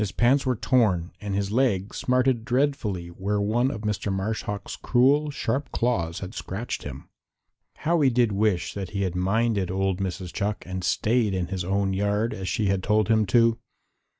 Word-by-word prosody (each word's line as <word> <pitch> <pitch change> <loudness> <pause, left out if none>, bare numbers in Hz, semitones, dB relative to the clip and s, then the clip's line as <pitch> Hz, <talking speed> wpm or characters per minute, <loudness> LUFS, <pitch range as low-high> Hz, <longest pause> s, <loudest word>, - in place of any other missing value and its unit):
His 105 -3 -1
pants 130 +8 +2
were 130 - +2
torn 105 -8 +2
and 100 -2 -3
his 100 0 -1
leg 110 -5 +1
smarted 125 -2 +1
dreadfully 120 - 0
where 100 +4 -2
one 115 +5 +1
of 110 -6 -5
Mr. 105 -1 -2
Marsh 95 +3 -2
Hawk's 105 0 -5
cruel, 140 +4 +3
sharp 140 0 -2
claws 85 -9 -1
had 95 +2 -6
scratched 110 +4 -4
him. - - -8 0.7
How 170 0 +1
he 135 - +5
did 120 -3 +2
wish 100 -3 0
that 95 -3 -5
he 100 - 0
had 90 -2 -1
minded 100 +1 +1
old 95 0 0
Mrs. 95 -2 -4
Chuck 105 0 -2
and 95 0 -5
stayed 105 +3 +1
in 90 -1 -2
his 95 -2 -3
own 95 +1 0
yard, 105 +3 0
as 95 -1 -4
she 110 -4 0
had 95 -1 +1
told 105 +2 +2
him 110 -2 +3
to. 115 +2 +3
105 Hz, 185 wpm, -25 LUFS, 95-120 Hz, 0.7 s, he